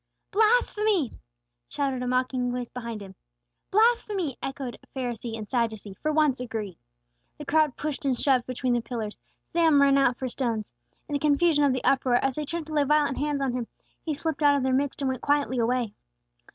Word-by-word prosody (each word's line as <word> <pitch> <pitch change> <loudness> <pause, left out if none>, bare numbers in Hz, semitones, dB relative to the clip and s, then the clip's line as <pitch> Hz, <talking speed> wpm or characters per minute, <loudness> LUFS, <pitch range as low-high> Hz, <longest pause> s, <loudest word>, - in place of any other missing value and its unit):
"Blasphemy!" 425 - +2 0.6
shouted 270 -3 -1
a 250 - -2
mocking 255 0 0
voice 245 -1 -4
behind 235 -3 -6
Him. 190 -1 -11 0.6
"Blasphemy!" 415 - +2
echoed 270 -2 -5 0.2
Pharisee 240 -3 -4
and 215 -1 -7
Sadducee 220 -5 -2
for 305 +10 -2
once 300 -4 +2
agreed. 220 -7 -5 0.6
The 295 - -8
crowds 305 -2 +2
pushed 300 -1 -4
and 265 -3 0
shoved 260 -3 +2
between 255 0 -1
the 240 - +1
pillars; 225 -3 -5 0.3
some 325 -4 +5
ran 275 0 +5
out 250 -3 +3
for 260 - -3
stones. 230 - -3 0.3
In - - -6
the 285 - +1
confusion 295 +1 +3
of 280 - +3
the 255 -1 -2
uproar, 260 -2 +3
as 270 +2 +2
they 300 +3 -3
turned 335 +2 -4
to 310 - -8
lay 295 -1 +3
violent 295 -1 +2
hands 290 -1 0
on 260 -2 0
Him, 245 -2 -3 0.4
He 310 -3 -2
slipped 320 +1 -3
out 290 -1 +5
of 275 - -1
their 260 0 +1
midst, 280 +1 0
and - - +1
went 260 - -3
quietly 285 -3 +1
away. 235 -2 0
270 Hz, 190 wpm, -26 LUFS, 245-300 Hz, 0.6 s, some